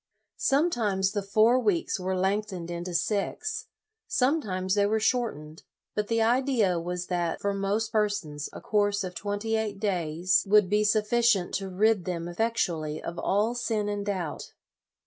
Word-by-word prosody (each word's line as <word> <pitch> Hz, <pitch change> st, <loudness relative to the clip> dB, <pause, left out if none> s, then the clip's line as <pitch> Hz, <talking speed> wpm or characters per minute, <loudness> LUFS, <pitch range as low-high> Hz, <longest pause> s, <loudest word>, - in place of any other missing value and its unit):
Sometimes 230 Hz, -, +1 dB
the 205 Hz, -1 st, -1 dB
four 215 Hz, +5 st, +4 dB
weeks 205 Hz, -2 st, 0 dB
were 185 Hz, 0 st, -2 dB
length 200 Hz, +3 st, 0 dB
7 180 Hz, -4 st, -6 dB
o -, -, -7 dB
LOYOLA 175 Hz, -, -7 dB
ened -, -, -3 dB
into 175 Hz, +1 st, -5 dB
six; 210 Hz, -, -1 dB, 0.4 s
sometimes 210 Hz, -10 st, 0 dB
they 205 Hz, 0 st, +3 dB
were 220 Hz, +1 st, +1 dB
short 240 Hz, -, +1 dB
ened; 155 Hz, +1 st, -12 dB, 0.3 s
but 210 Hz, -1 st, -1 dB
the 230 Hz, -1 st, +2 dB
idea 235 Hz, -6 st, +2 dB
was 180 Hz, +1 st, -4 dB
that 175 Hz, -2 st, -1 dB
for 200 Hz, 0 st, -1 dB
most 200 Hz, +3 st, -1 dB
per 210 Hz, -1 st, +2 dB
sons 155 Hz, -8 st, -5 dB
a -, -, -9 dB
course 205 Hz, -1 st, +1 dB
of 185 Hz, -1 st, -5 dB
twenty 205 Hz, +4 st, -2 dB
eight 215 Hz, -3 st, -2 dB
days 180 Hz, -3 st, +1 dB
would 210 Hz, -2 st, +5 dB
be 210 Hz, 0 st, +3 dB
sufficient 210 Hz, -2 st, +2 dB
to 195 Hz, -1 st, -2 dB
rid 205 Hz, +1 st, +2 dB
them 170 Hz, -2 st, -3 dB
effectually 175 Hz, -6 st, -1 dB
of 170 Hz, 0 st, -6 dB
all 210 Hz, +4 st, +1 dB
sin 225 Hz, -4 st, -1 dB
and 205 Hz, 0 st, -3 dB
doubt. 180 Hz, -6 st, -4 dB
205 Hz, 175 wpm, -27 LUFS, 180-220 Hz, 0.4 s, would